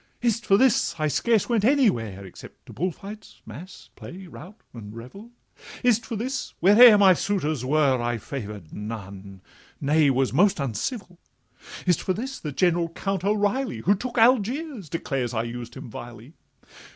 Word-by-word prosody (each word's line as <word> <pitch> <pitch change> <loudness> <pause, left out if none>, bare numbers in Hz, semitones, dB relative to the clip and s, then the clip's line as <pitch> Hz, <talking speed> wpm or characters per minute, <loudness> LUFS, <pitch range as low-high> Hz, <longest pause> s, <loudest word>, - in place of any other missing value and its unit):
Is 235 -2 +1
it - - -17
for 195 - +5
this 260 0 +2
I 155 -1 0
scarce 220 +7 +1
went 230 -4 +1
anywhere, 120 - +1
Except 95 - -14
to - - -12
bull 180 +6 -1
fights, 210 +5 -12
mass, 150 - -12
play, 185 +2 -10
rout, 185 +4 -13
and 110 -3 -10
revel? 160 - -11 0.5
Is 240 -3 +4
it - - -16
for 230 - -4
this, 255 +6 -4
whate'er 210 +5 +8
my 195 -2 +6
suitors 155 - -2
were, 135 -2 +2
I 120 0 -1
favor'd 105 - -8
none—nay, 105 +8 -3
was 130 -1 +1
almost 185 +6 +3
uncivil? 175 - -4 0.7
Is 180 -4 +3
it - - -7
for 185 - -1
this 265 +7 -5
that 150 -4 -7
General 175 -2 +2
Count 195 +2 -3
O'Reilly, 205 - 0
Who 195 - +3
took 240 +5 -5
Algiers, 245 - +1
declares 135 -7 -3
I 110 - 0
used 120 0 -7
him - - -9
vilely? 120 +4 -10
175 Hz, 165 wpm, -24 LUFS, -, 0.7 s, whate'er